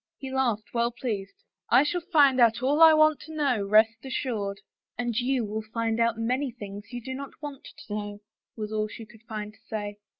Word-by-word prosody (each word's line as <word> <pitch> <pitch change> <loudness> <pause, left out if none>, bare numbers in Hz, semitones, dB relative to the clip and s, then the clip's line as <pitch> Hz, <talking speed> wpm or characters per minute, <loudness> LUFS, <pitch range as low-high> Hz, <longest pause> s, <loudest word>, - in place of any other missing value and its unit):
He 265 -1 -7
laughed, 235 -6 0
well 235 0 +2
pleased. 210 -5 -5 0.2
" - - -65
I 265 - +6
shall 350 +4 -1
find 295 -7 +4
out 235 +1 +4
all 290 +4 +2
I 325 0 +10
want 310 -1 +5
to 315 0 -10
know, 275 -8 +1
rest 220 +3 +4
assured." 220 -7 -3 0.2
" - - -58
And 240 -2 -2
you 250 0 +1
will 215 +1 -3
find 225 +1 -2
out 230 -1 +2
many 255 +5 0
things 205 -1 -9
you 245 -1 -6
do 260 +2 -5
not 275 +1 -8
want 290 -3 -8 0.2
to 205 - -7
know," 205 -1 -4 0.4
was 215 0 -4
all 215 0 0
she 225 +1 -9
could 220 0 -18
find 210 -1 -5
to 220 - -24
say. 205 -2 -4
230 Hz, 220 wpm, -27 LUFS, 215-265 Hz, 0.4 s, I